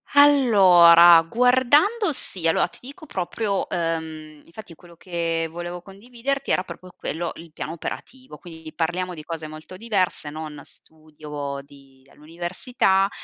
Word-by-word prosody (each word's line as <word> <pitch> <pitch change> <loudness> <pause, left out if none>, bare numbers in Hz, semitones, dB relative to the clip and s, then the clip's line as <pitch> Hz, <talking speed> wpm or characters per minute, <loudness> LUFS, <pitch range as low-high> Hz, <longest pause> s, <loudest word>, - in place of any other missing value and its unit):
Allora, 185 - +7
guardando 260 - +2
sì, 185 -9 -2
allora 165 - +2
ti 175 - -17
dico 280 +5 -11
proprio, 200 0 -3
ehm 160 -2 -4
infatti 170 -1 -12
quello 170 +1 -18
che 165 -1 -3
volevo 175 +1 -7
condividerti 245 +8 -5
era 185 - +1
proprio 180 +1 -11
quello, 170 +2 -4
il 165 -1 -13
piano 155 - -6
operativo, 255 - -8
quindi 160 -3 -12
parliamo 180 +2 -2
di 155 - -10
cose 160 -1 -6
molto 155 +4 -11
diverse, 190 -7 -2
non 150 -1 -8
studio 150 -3 -9
di 135 -2 -20
all'università 185 - -1
175 Hz, 130 wpm, -23 LUFS, 160-210 Hz, -, Allora